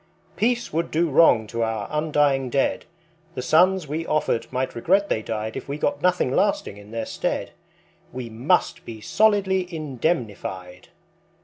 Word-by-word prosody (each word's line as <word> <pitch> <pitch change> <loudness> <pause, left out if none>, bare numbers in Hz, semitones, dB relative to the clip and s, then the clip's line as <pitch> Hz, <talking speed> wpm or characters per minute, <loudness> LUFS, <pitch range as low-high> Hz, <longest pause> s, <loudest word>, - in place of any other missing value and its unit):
Peace 240 -2 0
would 165 +2 -1
do 165 0 +1
wrong 130 -7 +5
to 115 +2 -4
our 110 -2 -1
undying 145 -3 +1
dead, 135 +2 0 0.5
The 125 - -4
sons 180 +4 +3
we 155 +3 -3
offered 135 -8 -1
might 130 +1 -2
regret 195 +11 +2
they 110 - 0
died 110 0 -4
If - - -7
we 140 - -3
got 285 - -1
nothing 180 -7 +2
lasting 200 - 0
in 105 0 -13
their 115 0 -4
stead. - - -3 0.6
We 125 -1 -6
must 125 +11 0
be 115 -1 -8
solidly 190 - +2
indemnified. 115 - -3
140 Hz, 150 wpm, -23 LUFS, 115-175 Hz, 0.6 s, wrong